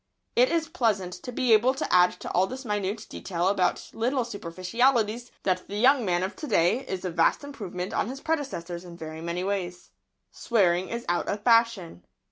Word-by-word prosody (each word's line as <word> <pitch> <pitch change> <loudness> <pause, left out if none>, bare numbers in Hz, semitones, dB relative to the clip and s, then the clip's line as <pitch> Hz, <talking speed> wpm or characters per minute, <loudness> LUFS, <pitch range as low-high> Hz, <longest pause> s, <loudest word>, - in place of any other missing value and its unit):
It 250 +1 +5
is 330 -1 +1
pleasant 205 - 0
to 250 - -6
be 245 -1 +2
able 245 +5 +4
to - - -2
add 180 0 +6
to - - -5
all 185 +2 +2
this 260 +3 -7
minute 210 0 -2
detail 175 -1 -2
about 185 -3 0
little 245 +2 0
superficialities 230 +4 0
that 185 -1 0
the 200 - -6
young 255 +3 +5
man 180 -3 +1
of 190 - -3
to 305 - -6
day 205 0 +3
is 190 -1 -4
a 180 - -2
vast 165 - +2
improvement 195 -10 -6
on 210 - 0
his 270 +2 -6
predecessors 220 - -3
in 175 -1 -11
very 160 -1 -7
many 170 +2 -3
ways. 180 -3 -4 0.4
Swearing 185 -5 +1
is 235 0 -4
out 175 0 0
of 205 0 -3
fashion. 230 - +2
200 Hz, 190 wpm, -27 LUFS, 180-240 Hz, 0.4 s, add